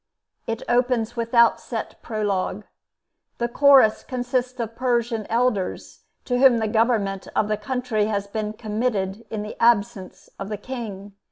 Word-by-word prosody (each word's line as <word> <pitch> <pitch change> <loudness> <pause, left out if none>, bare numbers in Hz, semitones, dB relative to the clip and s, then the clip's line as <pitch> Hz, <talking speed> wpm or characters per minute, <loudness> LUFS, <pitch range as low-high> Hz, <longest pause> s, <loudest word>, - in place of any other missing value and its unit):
It 230 0 -3
opens 240 -1 +1
without 235 0 +3
set 225 -3 -6
prologue. 205 -2 -2 0.7
The 235 - 0
Chorus 265 -3 +5
consists 250 0 -2
of 230 -1 -4
Persian 235 -3 -1
elders, 230 -5 -1 0.2
to 245 -2 0
whom 260 -3 +6
the 220 -1 0
government 215 -3 0
of 210 - +2
the 215 - 0
country 225 -1 -1
has 205 -2 -1
been 210 +1 -4
committed 215 -1 -2
in 215 -2 -4
the 210 - -7
absence 230 -4 +1
of 195 - -5
the 210 - -3
King. 205 -4 -7
225 Hz, 145 wpm, -23 LUFS, 210-245 Hz, 0.7 s, whom